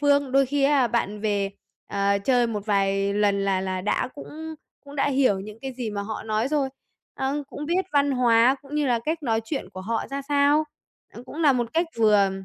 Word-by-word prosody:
phương, 285 -2 +2
đôi 275 0 +4
khi 285 +2 0
á 275 -3 +4
bạn 210 -3 -1
về, 205 -2 0 0.4
à, 200 0 +1
chơi 245 +4 +2
một 210 -3 -4
vài 195 -1 +1
lần 200 -1 +2
là 195 -1 +1
là 185 -1 -2
đã 210 +6 0
cũng 315 +2 -8 0.3
cũng 285 +1 -11
đã 275 - +2
hiểu 260 -8 +2
những 210 +2 -9
cái 265 - -4
gì 245 -3 -4
mà 200 -1 -3
họ 215 +2 -5
nói 220 +3 -1
rồi. 285 -3 +1 0.5
Ờ, 275 +2 -2
cũng 295 - -6
biết 360 +4 +1
văn 285 -1 +3
hóa 245 0 +4
cũng 285 +1 -10
như 300 -2 +1
là 240 -2 +2
cách 320 +1 -2
nói 225 -4 +1
chuyện 245 - -4
của 185 -1 -8
họ 225 +4 -2
ra 275 0 -3
sao, 290 +1 +3 0.5
ờ, 235 - -10
cũng 290 - -10
là 290 -3 +6
một 240 -2 -2
cách 335 +1 +2
vừa 210 -3 +4
245 Hz, 220 wpm, -25 LUFS, 205-285 Hz, 0.5 s, là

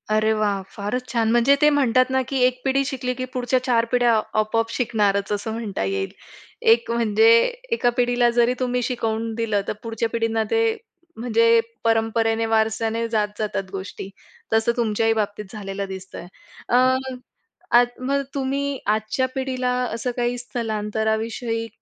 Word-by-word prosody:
अरे 215 0 +3
वाह! 205 -2 0
फारच 215 +5 -3
छान. 225 -2 +1
म्हणजे 240 +4 +5
ते 300 - +6
म्हणतात 255 -3 +3
ना, 265 0 +2
की 270 - -2
एक 250 0 +2
पिढी 275 +1 +2
शिकली, 255 -2 -2
की 255 +1 -4
पुढच्या 255 0 +1
चार 235 -3 +2
पिढ्या 245 -1 +3 0.3
आपोआप 225 +1 0
शिकणारच, 205 -5 0
असं 205 +2 -2
म्हणता 220 - -3
येईल. 95 0 -2 0.6
एक 230 0 -2
म्हणजे, 225 -1 +3 0.4
एका 255 - +2
पिढीला 245 0 +3
जरी 240 +1 +4
तुम्ही 250 -1 0
शिकवून 225 -2 -2
दिलं, 220 -3 0
तर - - -1
पुढच्या 225 0 -2
पिढींना 225 -1 0
ते 455 - +3 0.6
म्हणजे 230 0 +3 0.2
परंपरेने, 225 0 +1
वारसाने 225 +1 0
जात 215 -2 +1
जातात 210 -2 -2
गोष्टी. 195 0 -6 0.4
तसं 225 +1 +3
तुमच्याही 225 -1 +1
बाबतीत 210 -1 -2
झालेलं 200 -2 -5
दिसतंय. 190 -2 -8 0.4
अ, - - +3 1.0
आज 245 0 +5
मग 275 +2 0
तुम्ही 275 +1 -1
आजच्या 220 +4 0
पिढीला 260 -1 -1 0.2
असं 240 +2 -2
काही 245 0 0
स्थलांतराविषयी 225 0 -2
230 Hz, 145 wpm, -22 LUFS, 220-250 Hz, 1.0 s, ते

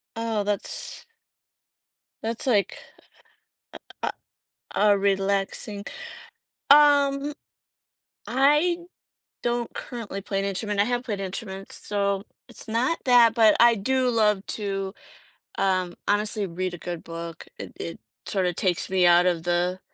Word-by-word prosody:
Oh, 225 -2 -1
that's 205 - -4 1.2
that's 230 +3 -3
like 210 -6 +2 1.0
a - - -13 0.2
a - - 0 0.7
a - - +1
a 200 - +3
relaxing 200 +1 -1 0.9
um 285 -1 +5 0.9
I 295 +7 +3 0.7
don't 240 -1 -1
currently 225 -6 -6
play 195 0 -2
an 195 - -1
instrument, 200 +1 -2
I - - +6
have 245 +1 -1
played 210 -5 -4
instruments, 195 0 -5
so 200 -1 0 0.3
it's - - -10
not 240 +9 0
that, 240 -3 +6
but 220 -2 +6
I 235 0 +7
do 255 +5 +1
love 210 -4 +2
to, 195 -2 -3 0.7
um, 185 -2 +1
honestly, 210 0 +1
read 185 +1 -3
a - - -8
good 175 +1 -6
book. 165 -1 -7
It - - -8
it, 85 - -6 0.3
sort 190 -2 0
of, 175 -1 -2
takes 180 -3 0
me 185 -2 +3
out 175 +1 +6
of 170 -2 0
the 175 +1 0
200 Hz, 130 wpm, -25 LUFS, 190-235 Hz, 1.2 s, I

